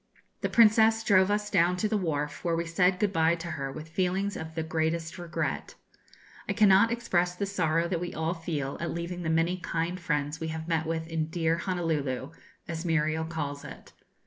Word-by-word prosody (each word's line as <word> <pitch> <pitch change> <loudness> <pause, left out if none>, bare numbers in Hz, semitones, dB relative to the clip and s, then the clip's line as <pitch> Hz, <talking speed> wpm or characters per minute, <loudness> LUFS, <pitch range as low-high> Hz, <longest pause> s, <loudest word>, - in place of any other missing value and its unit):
The - - 0
Princess 225 0 +5
drove 190 -3 +4
us 210 0 0
down 180 -1 +3
to 215 - +1
the 215 - -1
wharf, 150 -6 -2
where 170 -1 +1
we 170 +1 -1
said 180 +2 +2
good 205 0 0
bye 165 0 +3
to 170 0 -7
her 140 -3 -4
with 155 +3 -8
feelings 185 +4 -1
of 160 0 -7
the 160 - -1
greatest 160 +2 -2
regret. 170 -1 -3 0.7
I - - +2
cannot 205 +1 +5
express 180 -7 0
the 200 - -2
sorrow 170 -4 +1
that 170 -1 -2
we 175 - -3
all 160 +2 -1
feel 155 -5 -4
at 170 - -2
leaving 170 +1 -4
the 165 - -2
many 165 +3 +2
kind 175 0 -2
friends 150 -2 -1
we 160 - -3
have 160 0 -5
met 165 -2 0
with 160 0 -2
in 160 -1 -2
'dear 165 0 0
Honolulu,' 160 -7 -2 0.4
as 165 -1 -4
Muriel 160 -1 +1
calls 145 -3 -4
it. - - -11
170 Hz, 200 wpm, -28 LUFS, 160-185 Hz, 0.7 s, Princess